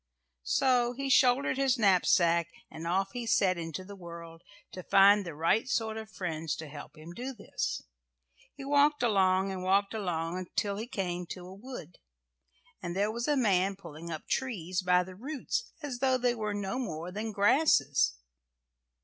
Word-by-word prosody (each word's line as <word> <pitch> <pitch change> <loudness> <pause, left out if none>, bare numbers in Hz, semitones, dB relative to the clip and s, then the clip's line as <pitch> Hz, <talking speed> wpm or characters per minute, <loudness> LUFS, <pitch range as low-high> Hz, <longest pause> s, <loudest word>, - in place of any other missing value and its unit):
So 245 - +3
he 275 +2 -3
shouldered 260 +1 +4
his 270 -1 +2
knapsack 175 -5 +3 0.2
and 160 +1 -7
off 195 +3 0
he 245 -1 -5
set 195 -5 +3
into 165 +2 -5
the 200 +2 -10
world 170 -2 -10 0.3
to 185 - -7
find 200 +3 +6
the 170 -4 -7
right 170 - +1
sort 225 -2 0
of 220 0 -7
friends 165 -6 -3
to 160 - -8
help 145 +2 -10
him 160 +2 -10
do 255 +6 -6
this. 205 - -4 0.7
He 275 - -8
walked 290 0 +3
along 195 -3 +3
and 190 -1 -5
walked 195 +2 +2
along 180 -3 -2
till 200 -1 0
he 220 +3 -5
came 180 -7 -3
to 180 +1 -7
a 185 - -10
wood, 200 - -10 0.8
and 175 0 -4
there 205 +2 +1
was 235 +2 -3
a 295 -1 +2
man 195 -5 +2
pulling 170 -3 -10
up 155 -2 -6
trees 185 -9 -2
by 180 0 +3
the 185 +1 -10
roots 295 - -4
as 265 -4 -4
though 260 -1 +3
they 245 -1 +1
were 215 -3 -3
no 200 +3 -3
more 170 -7 -4
than 215 +3 -4
grasses. 195 - +3
195 Hz, 175 wpm, -30 LUFS, 175-240 Hz, 0.8 s, find